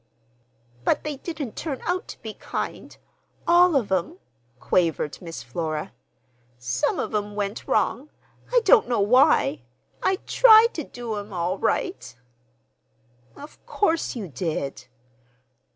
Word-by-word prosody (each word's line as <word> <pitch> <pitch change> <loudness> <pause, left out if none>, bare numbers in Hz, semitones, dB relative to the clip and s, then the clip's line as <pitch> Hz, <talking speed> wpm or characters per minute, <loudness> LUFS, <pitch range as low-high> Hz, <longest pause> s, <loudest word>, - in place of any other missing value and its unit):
"But - - +1
they 300 -2 -4
didn't 295 -6 -6
turn 285 -5 -4
out 360 +1 -1
to - - -10
be 220 -1 -6
kind—all 350 +8 -1
of 230 -8 0
'em," 180 -1 -1 0.4
quavered 160 -3 0
Miss 165 -6 -7
Flora. 155 +5 -4 0.6
"Some 120 +1 -1
of - - -3
'em 205 -1 -2
went 205 0 -4
wrong. 225 +7 0 0.4
I - - +4
don't 385 - +5
know 240 -3 +1
why. 200 - +4 0.4
I 380 - +2
tried 460 -1 +7
to 315 - -4
do 240 -4 -6
'em 205 +1 -7
all 180 +2 -2
right!" 355 - -2 1.2
"Of 290 +2 -13
course 330 -9 0
you 215 -6 -5
did!" 140 -4 -4
215 Hz, 125 wpm, -24 LUFS, -, 1.2 s, tried